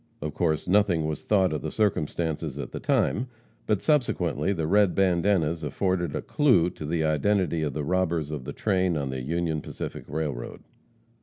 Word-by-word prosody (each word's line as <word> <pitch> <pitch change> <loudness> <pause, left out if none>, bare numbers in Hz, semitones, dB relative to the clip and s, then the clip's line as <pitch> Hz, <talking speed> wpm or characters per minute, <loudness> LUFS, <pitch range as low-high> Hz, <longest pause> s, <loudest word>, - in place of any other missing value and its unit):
Of 75 0 -4
course 80 -1 0
nothing 90 -4 +3
was 75 -2 -3
thought 95 -5 +2
of 75 - -2
the 80 - -3
circumstance 80 -5 0 0.2
at 70 - -5
the - - -5
time, 120 +6 +1 0.4
but 105 -3 +1
subsequently 145 - +1
the 80 -5 -1
red 100 +2 +3
bandanas 85 -3 +2
afforded 90 +2 -1
"a - - -3
clue" 115 - +3
to 75 - -7
the 80 0 0
identity 80 +2 +1
of 75 -3 -1
the 75 - -3
robbers 85 -2 0
of 70 -4 -5
a - - -3
train 95 -5 +1
on 70 -2 -2
the 65 -1 -4
Union 80 +2 -1
Pacific - - -7
railroad. 75 -6 -4
85 Hz, 175 wpm, -26 LUFS, 75-95 Hz, 0.4 s, nothing